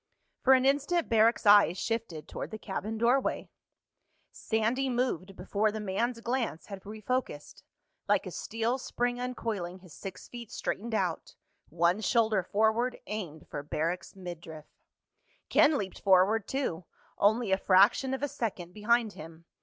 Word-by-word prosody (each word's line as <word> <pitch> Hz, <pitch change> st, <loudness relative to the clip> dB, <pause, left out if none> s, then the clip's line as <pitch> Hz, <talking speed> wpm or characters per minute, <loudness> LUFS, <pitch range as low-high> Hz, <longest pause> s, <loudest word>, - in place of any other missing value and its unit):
For 265 Hz, -, +6 dB
an 260 Hz, 0 st, +2 dB
instant 290 Hz, +5 st, +1 dB
Barrack's 225 Hz, +1 st, +3 dB
eyes 205 Hz, -4 st, +6 dB
shifted 215 Hz, -9 st, -3 dB
toward -, -, -6 dB
the 220 Hz, -, -6 dB
cabin 215 Hz, +1 st, -4 dB
doorway. 245 Hz, +4 st, +1 dB, 0.8 s
Sandy 235 Hz, +5 st, 0 dB
moved 240 Hz, -7 st, -1 dB
before 205 Hz, +4 st, 0 dB
the 220 Hz, -, -5 dB
man's 225 Hz, +4 st, -1 dB
glance 240 Hz, -8 st, -2 dB
had 195 Hz, -2 st, -8 dB
refocused. 215 Hz, -, -4 dB, 0.5 s
Like -, -, +2 dB
a -, -, -6 dB
steel 230 Hz, +3 st, -2 dB
spring 245 Hz, -1 st, -2 dB
uncoiling, 210 Hz, -8 st, -4 dB
his 180 Hz, -4 st, -15 dB
six 190 Hz, -2 st, -8 dB
feet 235 Hz, -2 st, -9 dB
straightened 225 Hz, +2 st, -3 dB
out—one 175 Hz, 0 st, -2 dB
shoulder 220 Hz, -3 st, +2 dB
forward, 220 Hz, +6 st, +1 dB
aimed 175 Hz, -8 st, -6 dB
for 145 Hz, -, -5 dB
Barrack's 165 Hz, +6 st, -3 dB
midriff. 170 Hz, -4 st, -8 dB, 0.8 s
Ken 295 Hz, 0 st, +5 dB
leaped 190 Hz, -2 st, -5 dB
forward 195 Hz, +3 st, +4 dB
too, 185 Hz, -, -2 dB, 0.3 s
only 220 Hz, +1 st, +3 dB
a 190 Hz, -, +4 dB
fraction 205 Hz, +9 st, +4 dB
of 265 Hz, -, -7 dB
a -, -, +2 dB
second 185 Hz, -9 st, -4 dB
behind 220 Hz, +1 st, +1 dB
him. 165 Hz, +1 st, -11 dB
215 Hz, 140 wpm, -30 LUFS, 185-240 Hz, 0.8 s, For